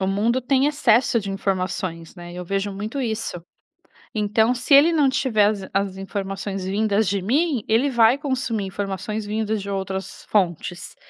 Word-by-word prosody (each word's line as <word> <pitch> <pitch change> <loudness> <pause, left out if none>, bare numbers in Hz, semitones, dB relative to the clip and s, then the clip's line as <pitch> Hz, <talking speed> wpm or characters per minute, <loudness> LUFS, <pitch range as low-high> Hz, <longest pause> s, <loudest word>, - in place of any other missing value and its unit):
O 190 - 0
mundo 220 +6 +1
tem 265 +2 +2
excesso 250 -4 +3
de 200 -1 -5
informações, 185 -4 -3
né, 175 -1 -10
eu 180 - -6
vejo 195 +2 -2
muito 215 +8 -4
isso. 220 -8 -3 0.7
Então, 220 +3 +2
se 255 +3 +2
ele 310 +5 +7
não 295 -4 +3
tiver 255 -7 +2
as 205 -2 0
in - - -8
as 195 -1 0
informações 195 0 -4
vindas 205 +1 +1
de 200 -1 0
mim, 270 - +1
ele 240 +6 +3
vai 235 0 +5
consumir 255 -7 -2
informações 205 +2 -4
vindas 215 0 -1
de 200 - -6
outras 190 0 -4
fontes. 175 -3 -1
210 Hz, 170 wpm, -22 LUFS, 195-240 Hz, 0.7 s, ele